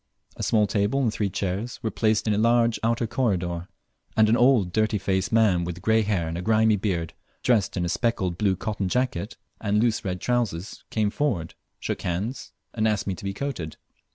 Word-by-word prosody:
A -, -, -8 dB
small 105 Hz, -2 st, +3 dB
table 105 Hz, +6 st, +1 dB
and 115 Hz, -4 st, +1 dB
three 100 Hz, -2 st, -1 dB
chairs 100 Hz, +5 st, -3 dB
were 110 Hz, -, -1 dB
placed 110 Hz, -1 st, +1 dB
in 105 Hz, -, +3 dB
a -, -, 0 dB
large 115 Hz, 0 st, +3 dB
outer 115 Hz, +1 st, +1 dB
corridor, 90 Hz, -8 st, -1 dB, 0.5 s
and 110 Hz, -1 st, +5 dB
an 115 Hz, -, +5 dB
old 120 Hz, -8 st, +4 dB
dirty 110 Hz, -1 st, +2 dB
faced 95 Hz, -1 st, -1 dB
man 105 Hz, -6 st, +4 dB
with 90 Hz, +1 st, -6 dB
grey 110 Hz, +2 st, +4 dB
hair 100 Hz, -6 st, 0 dB
and 80 Hz, -, -4 dB
a -, -, -4 dB
grimy 110 Hz, +1 st, +3 dB
beard, 90 Hz, -5 st, -2 dB, 0.3 s
dressed 110 Hz, -6 st, +2 dB
in 90 Hz, -, 0 dB
a -, -, -2 dB
speckled 95 Hz, -5 st, 0 dB
blue 95 Hz, 0 st, +1 dB
cotton 100 Hz, -1 st, -3 dB
jacket 120 Hz, -4 st, -1 dB, 0.2 s
and 105 Hz, -1 st, 0 dB
loose 115 Hz, 0 st, +1 dB
red 90 Hz, -2 st, -3 dB
trousers, 110 Hz, -6 st, -2 dB
came 105 Hz, -2 st, 0 dB
forward, 105 Hz, -, -1 dB, 0.3 s
shook -, -, -3 dB
hands, 100 Hz, +9 st, -3 dB, 0.2 s
and 110 Hz, -1 st, +1 dB
asked 105 Hz, -2 st, 0 dB
me 95 Hz, -, -1 dB
to 90 Hz, -, -10 dB
be 100 Hz, -, -2 dB
coated. 105 Hz, -, -4 dB
105 Hz, 200 wpm, -25 LUFS, 90-115 Hz, 0.5 s, and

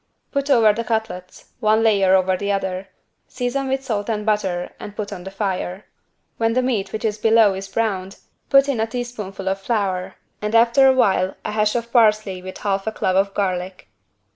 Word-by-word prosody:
Put 280 Hz, 0 st, -2 dB
over 225 Hz, -6 st, +5 dB
the 230 Hz, +2 st, -3 dB
cutlets, 215 Hz, -5 st, -4 dB
one 220 Hz, -1 st, +3 dB
layer 195 Hz, -4 st, +4 dB
over 185 Hz, 0 st, +2 dB
the 200 Hz, +2 st, -2 dB
other, 190 Hz, -1 st, -2 dB, 0.4 s
season 255 Hz, +2 st, -2 dB
with 265 Hz, 0 st, -1 dB
salt 215 Hz, -4 st, -2 dB
and 210 Hz, -2 st, -2 dB
butter 190 Hz, -5 st, -1 dB
and 205 Hz, -, -9 dB
put 205 Hz, -1 st, -5 dB
on 180 Hz, -, -9 dB
the -, -, -5 dB
fire. 195 Hz, -1 st, -3 dB, 0.5 s
When 225 Hz, 0 st, +1 dB
the 255 Hz, +1 st, +1 dB
meat 210 Hz, -7 st, -1 dB
which 220 Hz, -, -4 dB
is 215 Hz, -1 st, -1 dB
below 220 Hz, -2 st, +5 dB
is 195 Hz, +1 st, -6 dB
browned 195 Hz, -2 st, -2 dB, 0.3 s
put 275 Hz, 0 st, +5 dB
in 275 Hz, -5 st, -1 dB
a 220 Hz, -, +1 dB
teaspoonful 220 Hz, -5 st, -6 dB
of 195 Hz, +1 st, -1 dB
flour 195 Hz, -4 st, -2 dB, 0.3 s
and 210 Hz, +2 st, -2 dB
after 235 Hz, +4 st, +5 dB
a 265 Hz, -, +6 dB
while 190 Hz, -6 st, +2 dB
a -, -, -2 dB
hash 210 Hz, +1 st, +1 dB
of 235 Hz, 0 st, -3 dB
parsley 215 Hz, -5 st, +3 dB
with 185 Hz, 0 st, -8 dB
half 195 Hz, 0 st, -2 dB
a -, -, +1 dB
clove 185 Hz, -3 st, -1 dB
of 195 Hz, +1 st, +1 dB
garlic. 185 Hz, -2 st, -3 dB
210 Hz, 195 wpm, -21 LUFS, 190-230 Hz, 0.5 s, a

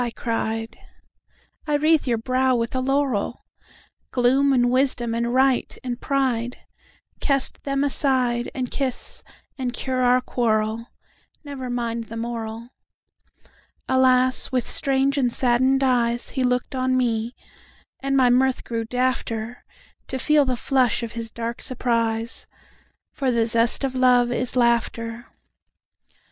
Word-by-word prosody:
I 240 Hz, -, -2 dB
cried;"I 225 Hz, +6 st, -6 dB
wreathe 305 Hz, 0 st, +2 dB
your 235 Hz, -2 st, +1 dB
brow 255 Hz, +2 st, +1 dB
with 230 Hz, -1 st, -2 dB
a -, -, +1 dB
laurel! 260 Hz, -4 st, -1 dB, 0.6 s
Gloom 265 Hz, +3 st, +3 dB
and 245 Hz, -2 st, +3 dB
wisdom 250 Hz, -3 st, +1 dB
and 235 Hz, +1 st, -1 dB
right 260 Hz, 0 st, +2 dB
and 245 Hz, -2 st, -4 dB
prideCast 265 Hz, +1 st, -2 dB
them 275 Hz, 0 st, -1 dB
aside, 255 Hz, -4 st, +1 dB
And 255 Hz, -2 st, -3 dB
kiss, 265 Hz, -3 st, -3 dB, 0.4 s
and 250 Hz, -2 st, -2 dB
cure 255 Hz, +1 st, -2 dB
our 250 Hz, 0 st, +4 dB
quarrel. 225 Hz, -2 st, -1 dB, 0.6 s
Never 275 Hz, -3 st, -6 dB
mind 235 Hz, -1 st, -3 dB
the 230 Hz, +1 st, -8 dB
moral!"Alas! 245 Hz, +3 st, -2 dB
with 255 Hz, -2 st, 0 dB
strange 275 Hz, +1 st, +1 dB
and 250 Hz, -3 st, +1 dB
saddened 260 Hz, +2 st, +3 dB
eyesHe 245 Hz, 0 st, +1 dB
looked 250 Hz, +1 st, 0 dB
on 255 Hz, 0 st, 0 dB
me; 235 Hz, -1 st, -1 dB, 0.6 s
and 275 Hz, 0 st, 0 dB
my 250 Hz, -2 st, +4 dB
mirth 260 Hz, +1 st, +2 dB
grew 230 Hz, -1 st, -3 dB
dafter, 245 Hz, -1 st, -2 dB, 0.5 s
To 265 Hz, -, -4 dB
feel 295 Hz, +2 st, +3 dB
the 255 Hz, -1 st, 0 dB
flush 255 Hz, -3 st, +1 dB
of 230 Hz, -, -5 dB
his 230 Hz, -1 st, -5 dB
dark 235 Hz, +1 st, -5 dB
surprise; 230 Hz, -2 st, -2 dB, 0.7 s
For 270 Hz, -3 st, -1 dB
the 235 Hz, -2 st, +2 dB
zest 230 Hz, +3 st, +3 dB
of 270 Hz, -1 st, -1 dB
love 250 Hz, -1 st, +3 dB
is 245 Hz, +1 st, 0 dB
laughter. 235 Hz, -1 st, 0 dB
250 Hz, 125 wpm, -23 LUFS, 235-260 Hz, 0.7 s, our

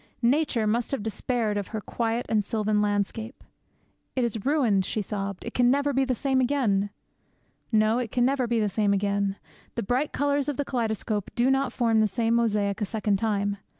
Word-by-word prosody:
Nature 250 Hz, -2 st, +2 dB
must 230 Hz, +3 st, 0 dB
have 275 Hz, -7 st, -2 dB
despaired 220 Hz, -1 st, -1 dB
of 200 Hz, -2 st, -3 dB
her 220 Hz, -, -4 dB
quiet 230 Hz, +2 st, -2 dB
and 215 Hz, -2 st, +1 dB
sylvan 215 Hz, 0 st, 0 dB
landscape. 210 Hz, +3 st, -2 dB, 0.7 s
'It 255 Hz, -, +1 dB
is 225 Hz, -3 st, -2 dB
ruined,' 245 Hz, -10 st, +3 dB
she 215 Hz, -, -2 dB
sobbed; 200 Hz, -1 st, -4 dB
'it 235 Hz, -, -5 dB
can 245 Hz, -1 st, +4 dB
never 285 Hz, +2 st, +2 dB
be 270 Hz, +1 st, +2 dB
the 255 Hz, -1 st, 0 dB
same 265 Hz, +2 st, +1 dB
again!' 235 Hz, -7 st, +1 dB, 0.8 s
No, 220 Hz, +1 st, +3 dB
it 235 Hz, -4 st, -3 dB
can 245 Hz, -1 st, +2 dB
never 260 Hz, -1 st, +1 dB
be 235 Hz, -1 st, +1 dB
the 210 Hz, -, +2 dB
same 205 Hz, 0 st, +1 dB
again. 200 Hz, 0 st, 0 dB, 0.4 s
The -, -, -2 dB
bright 255 Hz, +8 st, 0 dB
colours 285 Hz, 0 st, 0 dB
of 290 Hz, -, -3 dB
the 285 Hz, -, -1 dB
kaleidoscope 220 Hz, -4 st, -2 dB
do 245 Hz, +3 st, +3 dB
not 270 Hz, 0 st, +1 dB
form 230 Hz, -3 st, +2 dB
the 215 Hz, -, +4 dB
same 225 Hz, +3 st, 0 dB
mosaic 210 Hz, -3 st, +1 dB
a -, -, +2 dB
second 210 Hz, -1 st, 0 dB
time. 205 Hz, -1 st, 0 dB
225 Hz, 195 wpm, -26 LUFS, 205-250 Hz, 0.8 s, can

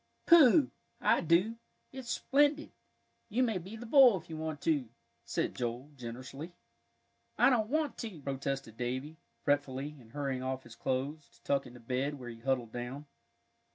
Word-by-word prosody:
"Pooh! 305 Hz, -4 st, +7 dB, 0.3 s
I -, -, +3 dB
do; 180 Hz, +8 st, +3 dB, 0.3 s
it's 260 Hz, -2 st, -8 dB
splendid! 290 Hz, +2 st, +2 dB, 0.6 s
You 240 Hz, +5 st, +2 dB
may 220 Hz, -6 st, +1 dB
be 190 Hz, +6 st, -9 dB
the 230 Hz, +2 st, -8 dB
bull, 250 Hz, -4 st, +7 dB
if 165 Hz, -1 st, -11 dB
you -, -, -4 dB
want 155 Hz, -1 st, -4 dB
to," 145 Hz, -7 st, +1 dB, 0.4 s
said -, -, -1 dB
Joel, 125 Hz, +4 st, -4 dB
generously. 130 Hz, +7 st, -8 dB, 0.8 s
"I -, -, +6 dB
don't 220 Hz, -3 st, +2 dB
want 310 Hz, +1 st, 0 dB
to," 215 Hz, -9 st, -6 dB
protested 135 Hz, -4 st, -4 dB
Davie, 130 Hz, +6 st, -3 dB, 0.3 s
fretfully, 145 Hz, 0 st, 0 dB
and 115 Hz, -2 st, -17 dB
hurrying 140 Hz, -3 st, -2 dB
off 130 Hz, 0 st, -3 dB
his 115 Hz, -1 st, -13 dB
clothes, 140 Hz, +5 st, -2 dB
to -, -, -26 dB
tuck 140 Hz, -2 st, 0 dB
into 125 Hz, 0 st, -12 dB
bed, 130 Hz, +5 st, -1 dB
where 125 Hz, -3 st, -8 dB
he 115 Hz, -1 st, -9 dB
huddled 125 Hz, -2 st, -1 dB
down. 125 Hz, +5 st, -5 dB
145 Hz, 160 wpm, -32 LUFS, 130-215 Hz, 0.8 s, Pooh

